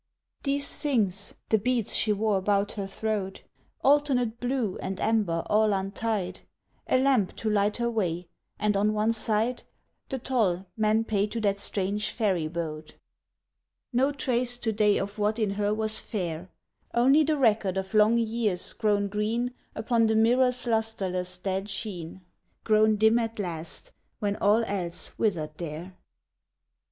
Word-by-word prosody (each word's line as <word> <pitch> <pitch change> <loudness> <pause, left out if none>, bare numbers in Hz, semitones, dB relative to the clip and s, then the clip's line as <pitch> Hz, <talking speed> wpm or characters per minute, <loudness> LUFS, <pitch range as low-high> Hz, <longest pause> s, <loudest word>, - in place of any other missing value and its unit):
These 280 0 +2
things 205 -9 0
the 220 - +3
beads 240 0 0
she 215 - +2
wore 210 0 +1
about 200 +1 +1
her 200 -2 -5
throat 200 -1 -3 0.4
Alternate 265 -5 +2
blue 245 -6 -2
and 190 0 -4
amber 205 -7 +1
all 215 0 +3
untied, 195 -1 -2 0.5
A - - +3
lamp 255 -7 +2
to 220 - -2
light 205 0 +1
her 235 0 0
way, 180 -7 -2 0.3
and 210 -1 0
on 210 +2 +2
one 215 +2 +1
side 225 +2 0 0.5
The 265 - -2
toll 215 -8 0
men 220 0 +2
pay 210 -2 0
to 230 - -4
that 200 -1 +1
strange 200 +1 0
ferry 190 -8 0
boat. 155 -2 -6 1.0
No 265 +4 +3
trace 250 -3 +1
to 235 -2 -1
day 210 -1 +3
of 200 +2 -4
what 210 +2 +1
in 215 -3 0
her 205 +1 0
was 215 0 +2
fair! 180 -4 -4 0.5
Only 270 +6 +5
the 305 0 +1
record 215 -7 +2
of 190 +1 -4
long 215 +2 +5
years 220 -5 0
grown 205 -2 +1
green 220 +5 -1 0.2
Upon 230 0 +1
the 220 - +1
mirror's 250 +3 +3
lustreless 190 -6 -1
dead 195 +2 -3
sheen, 190 -4 -5 0.4
Grown 215 0 +4
dim 220 +2 +4
at 225 -1 -3
last, 175 - -2 0.3
when 205 -3 -1
all 215 +3 +3
else 180 -5 -2
withered 160 -8 -1
there. 170 +3 -6
215 Hz, 150 wpm, -27 LUFS, 195-230 Hz, 1.0 s, Only